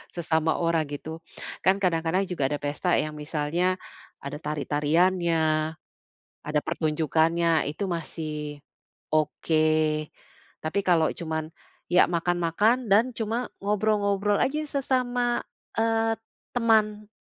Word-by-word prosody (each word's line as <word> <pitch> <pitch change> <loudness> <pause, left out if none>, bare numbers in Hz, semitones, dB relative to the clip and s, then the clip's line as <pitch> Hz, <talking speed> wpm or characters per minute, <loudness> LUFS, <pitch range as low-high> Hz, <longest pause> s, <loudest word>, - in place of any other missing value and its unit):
sesama 160 -2 +1
orang, 165 -2 +1
gitu. 155 +3 -6 0.4
Kan 190 - +4
kadang-kadang 170 +1 +2
juga 145 -7 0
ada 145 - -1
pesta 150 +5 0
yang 155 - 0
misalnya 150 +4 -1 0.5
ada 140 +1 -5
tari-tariannya, 160 +4 +1 1.1
ada 150 0 +2
pertunjukannya 160 +1 +1
itu 150 +7 -4
masih 150 -3 -5 0.5
oke. 155 +1 +1 1.0
Tapi 160 +6 0
kalo 165 -3 +4
cuman, 160 -1 -3 0.4
ya 180 - +7
makan-makan 175 +8 +1
dan 225 +6 +5
cuma 230 +2 -2
ngobrol-ngobrol 205 -1 +1
aja 295 +3 +1
sesama, 250 -3 0 0.3
eee, 225 0 +2 0.4
teman. 215 -3 +2
170 Hz, 100 wpm, -26 LUFS, 155-210 Hz, 1.1 s, ya